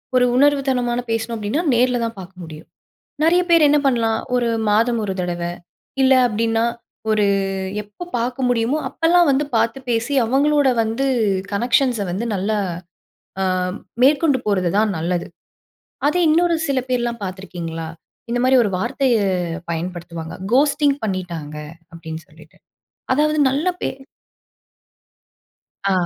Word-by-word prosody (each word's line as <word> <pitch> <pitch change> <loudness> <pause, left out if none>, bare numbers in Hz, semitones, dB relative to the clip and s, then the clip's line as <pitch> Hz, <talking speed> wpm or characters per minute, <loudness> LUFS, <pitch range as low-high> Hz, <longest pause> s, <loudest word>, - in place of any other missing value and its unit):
ஒரு 250 0 +5
உணர்வு 285 +2 +4
தனமான 245 -2 0
பேசணும் 225 +1 -2
அப்படின்னா 215 +9 -1
நேர்ல 245 +1 +2
தான் 230 0 -5
பார்க்க 185 0 -11
முடியும். 155 -2 -11 0.6
நெறைய 345 +3 +4
பேர் 335 -3 +6
என்ன 295 +1 +4
பண்ணலாம்? 230 -4 +2 0.2
ஒரு 240 -1 +1 0.2
மாதம் 230 +3 +2
1 195 - -2
தடவை, 175 -1 -3 0.5
இல்லை 260 0 +5
அப்படின்னா, 225 0 0 0.5
ஒரு 215 -1 +3 0.6
எப்ப 210 - -10
பார்க்க 250 +2 -1
முடியுமோ, 245 +4 +1
அப்பல்லாம் 340 0 +3
வந்து 275 +2 +1
பார்த்து 230 +4 0
பேசி, 235 +4 0
அவங்களோட 285 +4 +2 0.2
வந்து 225 +5 -1 0.5
கனெக்ஷன்ஸை 240 0 +1
வந்து 210 +7 -2
நல்லா 205 +3 -1 0.8
அ - - +2 0.6
மேற்கொண்டு 285 0 +4
போறது 185 -4 +1
தான் 215 +1 +3
நல்லது. 170 +2 -2 0.8
அதே, 355 +4 +2
இன்னொரு 340 +2 +3
சில 275 -2 +1
பேர்லாம் 240 -2 -1
பார்த்திருக்கீங்களா? 175 -4 -6 0.4
இந்த 240 +1 0
மாரி 260 +1 +4
ஒரு 210 - 0
வார்த்தையை 235 +2 +1 0.5
பயன்படுத்துவாங்க. 170 -1 -5 0.2
"கோஸ்ட்டிங் 285 +1 +3
பண்ணிட்டாங்க." 175 -7 -4 0.4
அப்படின்னு 160 -1 -7
சொல்லிட்டு. - - -19 0.6
அதாவது 305 +2 +2
நல்ல 285 +6 -1
பே - - 0 2.0
ஆ. - - +3
235 Hz, 125 wpm, -20 LUFS, 195-270 Hz, 2.0 s, பேர்